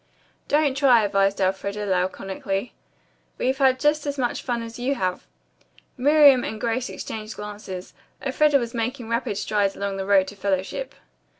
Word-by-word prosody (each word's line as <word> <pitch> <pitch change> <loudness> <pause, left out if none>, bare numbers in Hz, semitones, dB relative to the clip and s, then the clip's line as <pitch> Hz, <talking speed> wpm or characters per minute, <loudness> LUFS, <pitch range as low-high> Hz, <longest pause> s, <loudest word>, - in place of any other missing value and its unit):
"Don't 290 -2 +2
try," 260 -5 +5
advised 195 -1 +1
Elfreda 200 +2 -1
laconically. 195 +3 -2 0.6
"We've 260 +1 0
had 260 -1 +4
just 295 +1 +1
as 285 0 -2
much 245 -3 -1
fun 240 -2 -2
as 230 +1 -9
you 265 +3 0
have." 185 -6 -2 0.7
Miriam 285 -1 +6
and 220 - -4
Grace 235 +3 -1
exchanged 215 0 -6
glances. 205 -3 -7 0.3
Elfreda 290 +2 +3
was 235 -3 -3
making 240 0 -3
rapid 230 -3 -1
strides 205 -1 0
along 200 -1 -3
the 190 0 -4
road 195 -2 +4
to 205 - -11
fellowship. 195 - -2
225 Hz, 155 wpm, -24 LUFS, 195-260 Hz, 0.7 s, Miriam